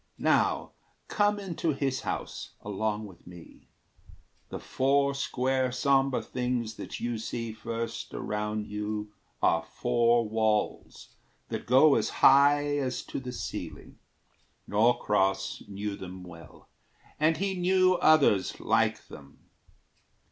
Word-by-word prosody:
Now -, -, +1 dB, 0.4 s
come 205 Hz, 0 st, +1 dB
into 170 Hz, -5 st, -2 dB
his 135 Hz, -1 st, -2 dB
house, -, -, -5 dB
along 105 Hz, +1 st, -2 dB
with 95 Hz, -4 st, -15 dB
me: 85 Hz, -2 st, -14 dB, 0.8 s
The -, -, -5 dB
four 140 Hz, +1 st, +1 dB
square 130 Hz, -1 st, 0 dB
sombre 135 Hz, +1 st, +2 dB
things 125 Hz, -3 st, -2 dB
that -, -, -7 dB
you 120 Hz, -2 st, -3 dB
see 115 Hz, 0 st, -4 dB
first 115 Hz, +1 st, -5 dB
Around 105 Hz, 0 st, -3 dB
you 105 Hz, 0 st, -4 dB, 0.3 s
are 80 Hz, -, +3 dB
four 120 Hz, +3 st, +1 dB
walls 110 Hz, -1 st, -1 dB, 0.4 s
that -, -, -5 dB
go 135 Hz, +4 st, +6 dB
as -, -, +1 dB, 0.2 s
high 145 Hz, +1 st, +5 dB
As 130 Hz, -3 st, -2 dB
to -, -, -5 dB
the 125 Hz, -1 st, -6 dB
ceiling. -, -, -7 dB, 0.7 s
Norcross 105 Hz, -3 st, +1 dB
knew 100 Hz, 0 st, -4 dB
them 95 Hz, -1 st, -9 dB
well, 85 Hz, -3 st, -13 dB, 0.5 s
And 155 Hz, +1 st, +3 dB
he 195 Hz, 0 st, -1 dB
knew 185 Hz, 0 st, +3 dB
others 140 Hz, -11 st, +3 dB
like -, -, +1 dB
them. 70 Hz, -1 st, -15 dB
120 Hz, 120 wpm, -28 LUFS, 105-140 Hz, 0.8 s, go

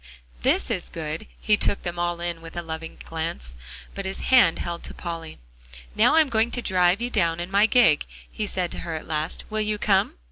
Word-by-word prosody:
This -, -, +2 dB
is -, -, -2 dB
good," 160 Hz, +4 st, -5 dB
he 210 Hz, -, +3 dB
took 200 Hz, -, +1 dB
them 175 Hz, 0 st, -4 dB
all 175 Hz, 0 st, -1 dB
in 170 Hz, -1 st, -2 dB
with 165 Hz, +1 st, -10 dB
a 175 Hz, -, -2 dB
loving 160 Hz, 0 st, -6 dB
glance, 160 Hz, -, -4 dB, 0.4 s
but 195 Hz, -, -5 dB
his 190 Hz, 0 st, -3 dB, 0.2 s
hand 240 Hz, -10 st, +6 dB
held 170 Hz, 0 st, -4 dB
to -, -, -5 dB
Polly. 165 Hz, -2 st, -6 dB, 0.6 s
"Now -, -, +5 dB
I'm 320 Hz, -2 st, +5 dB
going 225 Hz, -2 st, +2 dB
to 245 Hz, -, -3 dB
drive 185 Hz, +2 st, +3 dB
you 245 Hz, -, -2 dB
down 165 Hz, -4 st, +1 dB
in 175 Hz, +2 st, -5 dB
my 200 Hz, +2 st, +5 dB
gig," 230 Hz, -, +4 dB, 0.2 s
he 215 Hz, -, -3 dB
said 180 Hz, -3 st, -2 dB
to -, -, -3 dB
her 165 Hz, -2 st, -4 dB
at 155 Hz, -, -6 dB
last. 155 Hz, 0 st, -2 dB
"Will 215 Hz, 0 st, 0 dB
you 215 Hz, 0 st, -1 dB
come?" 195 Hz, -2 st, +2 dB
175 Hz, 215 wpm, -24 LUFS, 165-210 Hz, 0.6 s, hand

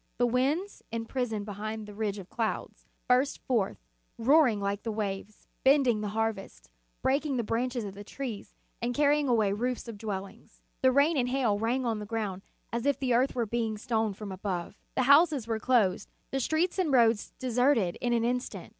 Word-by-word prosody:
The 245 Hz, -, +3 dB
winds, 275 Hz, -, 0 dB
imprisoned 225 Hz, -2 st, -2 dB
be 205 Hz, -, -6 dB
hind 215 Hz, +2 st, -5 dB
that 210 Hz, -, -9 dB
ridge 210 Hz, -1 st, -2 dB
of 190 Hz, -3 st, -8 dB
clouds, 225 Hz, 0 st, -3 dB, 0.2 s
burst 255 Hz, +3 st, +3 dB
forth, 230 Hz, -7 st, 0 dB, 0.4 s
roaring 255 Hz, -2 st, +4 dB
like 200 Hz, 0 st, -2 dB
the 225 Hz, -, -3 dB
waves, 210 Hz, -1 st, -4 dB, 0.2 s
bending 265 Hz, -5 st, +4 dB
the 210 Hz, -, -2 dB
harvests, 220 Hz, -, -3 dB, 0.3 s
break 275 Hz, +3 st, +2 dB
ing 285 Hz, -4 st, -1 dB
the 235 Hz, -, 0 dB
branches 240 Hz, +2 st, -1 dB
of 200 Hz, -2 st, -6 dB
the 205 Hz, +1 st, -9 dB
trees, 230 Hz, -1 st, -6 dB, 0.3 s
and 240 Hz, +1 st, -1 dB
carrying 290 Hz, 0 st, +3 dB
away 215 Hz, -5 st, +3 dB
roofs 245 Hz, +4 st, -2 dB
of 220 Hz, -3 st, -8 dB
dwellings. 200 Hz, -3 st, -7 dB, 0.2 s
The 260 Hz, -, +5 dB
rain 285 Hz, +4 st, +3 dB
and 250 Hz, -2 st, +1 dB
hail 245 Hz, -6 st, +1 dB
rang 245 Hz, +4 st, 0 dB
on 225 Hz, -2 st, 0 dB
the 210 Hz, -, -7 dB
ground 210 Hz, -4 st, -3 dB, 0.3 s
as 235 Hz, +3 st, -1 dB
if 285 Hz, -, +2 dB
the 260 Hz, -3 st, 0 dB
earth 255 Hz, +3 st, +2 dB
were 240 Hz, -2 st, +1 dB
being 225 Hz, -1 st, -2 dB
stoned 220 Hz, -3 st, -1 dB
from 210 Hz, -2 st, -6 dB
above. 185 Hz, -1 st, -4 dB, 0.2 s
The 260 Hz, -, +2 dB
houses 285 Hz, -1 st, +5 dB
were 225 Hz, -1 st, -2 dB
closed, 220 Hz, -6 st, +2 dB, 0.2 s
the 270 Hz, -, 0 dB
streets 320 Hz, +8 st, 0 dB
and 345 Hz, -6 st, +1 dB
roads 230 Hz, -4 st, +3 dB
deserted 245 Hz, -6 st, +2 dB
in 245 Hz, -, 0 dB
an 235 Hz, -1 st, +2 dB
instant. 250 Hz, +1 st, -3 dB
235 Hz, 190 wpm, -29 LUFS, 210-260 Hz, 0.4 s, The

